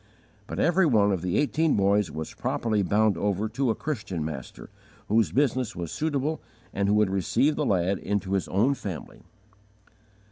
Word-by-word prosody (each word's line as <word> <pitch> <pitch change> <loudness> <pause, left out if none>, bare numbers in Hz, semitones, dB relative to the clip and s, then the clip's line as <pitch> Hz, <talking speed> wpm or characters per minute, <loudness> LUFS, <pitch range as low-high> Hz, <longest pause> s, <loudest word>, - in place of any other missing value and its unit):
But - - -6
every 175 +1 +3
one 105 -6 +3
of 95 -4 -1
the 90 +1 -1
eighteen 155 +1 +2
boys 100 0 +2
was 80 +1 -6
properly 110 -3 -1
bound 105 +1 +2
over 100 +2 0
to 130 +3 -1
a 110 - +1
Christian 105 - -4
master, 70 -5 -8 0.4
whose 110 +1 +3
business 130 -4 0
was 85 -2 -5
suitable 155 0 -1 0.3
and 100 0 0
who 105 - +3
would 105 -2 +3
receive 100 - +1
the 150 - -1
lad 95 0 +1
into 100 -1 -2
his 95 - 0
own 115 +9 +2
family. 95 - -7
105 Hz, 170 wpm, -26 LUFS, 95-135 Hz, 0.4 s, every